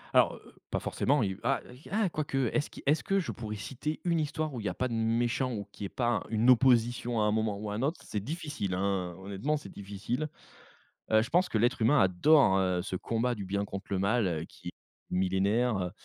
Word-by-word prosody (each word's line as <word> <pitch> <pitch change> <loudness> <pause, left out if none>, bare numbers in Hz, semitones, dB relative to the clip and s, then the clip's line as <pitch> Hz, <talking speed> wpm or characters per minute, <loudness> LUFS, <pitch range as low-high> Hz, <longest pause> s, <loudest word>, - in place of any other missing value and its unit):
Alors, - - +5
heu - - -13
heu, - - -17 0.2
pas - - -1
forcément, 140 -1 +1
il 95 -2 -2
va - - 0 0.3
ah 215 0 +2
quoique, 155 -4 -3 0.2
est-ce 150 - 0
qui - - -12
est-ce 145 +3 +3
que 195 0 +1
je 180 - -2
pourrais 110 -2 -5
citer 135 +8 -4
une 170 -2 +2
histoire 155 0 -2
où 125 - -4
il 105 - -6
y - - +1
a 90 - -5
pas 130 - 0
de 120 - -5
méchant 115 +3 +1
ou 100 -3 -4
qu'il 100 - -7
y - - -2
ait - - -13
pas 120 - -1
un - - -4
une 115 +3 +4
opposition 120 -1 +3
à - - +3
un 105 - +3
moment 110 -1 0
ou 105 0 -5
à - - -3
un 105 - -2
autre? 150 +6 0
C'est 105 -2 -3
difficile, 145 - -3
hein, 95 -2 -1
honnêtement 100 +11 -2
c'est 145 - -9
difficile. 105 +9 -4 0.8
Heu, 110 0 +6
je 115 - -4
pense 180 +6 +3
que - - 0
l'être 120 +3 +2
humain 135 +6 +5
adore, 95 - +5
heu, 90 -2 +1
ce 95 - -4
combat 115 +5 -1
du 105 - -5
bien 100 +2 -1
contre 100 -1 -7
le 100 -2 0
mal, 95 -6 +1
qui - - -9
est - - -10 0.4
millénaire. 95 +2 +1
115 Hz, 240 wpm, -30 LUFS, 100-135 Hz, 0.8 s, Heu